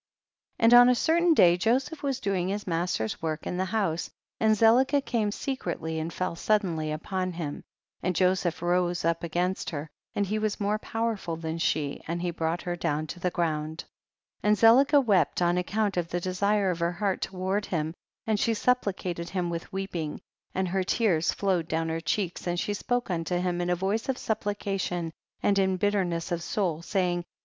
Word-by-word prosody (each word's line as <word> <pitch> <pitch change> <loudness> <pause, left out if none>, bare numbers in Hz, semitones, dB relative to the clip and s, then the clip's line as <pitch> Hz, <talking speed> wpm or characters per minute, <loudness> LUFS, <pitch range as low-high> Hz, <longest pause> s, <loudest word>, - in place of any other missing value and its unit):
40. - - +2
And 230 - +7
on 245 0 +9
a 250 - +4
certain 335 +5 +3
day 175 - +6
Joseph 260 - 0
was 275 -3 -1
doing 190 -3 -1
his 205 +2 -3
master's 165 - -1
work 155 -1 -3
in 180 - -3
the 185 - 0
house, 190 -5 -1 0.3
and 220 0 +4
Zelicah 255 +6 +5
came 220 -4 0
secretly 170 - -3
and 160 +1 -3
fell 180 0 -2
suddenly 170 -6 0
upon 185 +4 -3
him, 160 -4 -5 0.4
and 180 -1 -1
Jo 185 +2 +4
seph 175 -2 -3
rose 175 0 +1
up 165 0 +1
against 175 +3 -1
her, 150 -1 -5 0.2
and 205 - +1
he 215 +3 -1
was 215 -1 -1
more 210 +1 0
powerful 225 -7 -2
than 160 0 -4
she, 145 -3 0
and 170 +1 -2
he 175 - 0
brought 165 +1 -2
her 175 -1 -2
down 155 -2 -1
to 175 - -8
the 180 - 0
ground. 160 -2 -2 0.6
41. 210 - +1
And 210 - +4
Zelicah 270 +7 +6
wept 195 -6 +3
on 175 0 +2
account 200 +2 -1
of 175 -1 0
the 175 - -1
desire 195 +2 +1
of 175 - -4
her 170 +1 0
heart 195 +1 -1
toward 190 +2 -2
him, 160 -2 -2 0.3
and 220 -2 +1
she 225 +2 +2
supplicated 190 -8 -1
him 180 -2 -2
with 170 0 -5
weep 195 -1 -4
ing, 155 -3 -3 0.4
and 190 0 0
her 190 +1 0
tears 185 -5 +2
flowed 185 -5 0
down 165 0 -1
her 165 0 -2
cheeks, 180 0 -2
and 175 0 0
she 205 - -1
spoke 245 +1 -1
unto 170 +1 -1
him 175 0 -1
in 175 - -1
a 180 - +3
voice 200 +7 -1
of 260 - 0
supplication 195 -6 -2 0.3
and 200 -1 +3
in 190 -1 +2
bitterness 185 -4 0
of 170 -1 -1
soul, 170 -3 -1
saying, 180 -1 0
42. 175 - -9
185 Hz, 200 wpm, -27 LUFS, 170-210 Hz, 0.6 s, on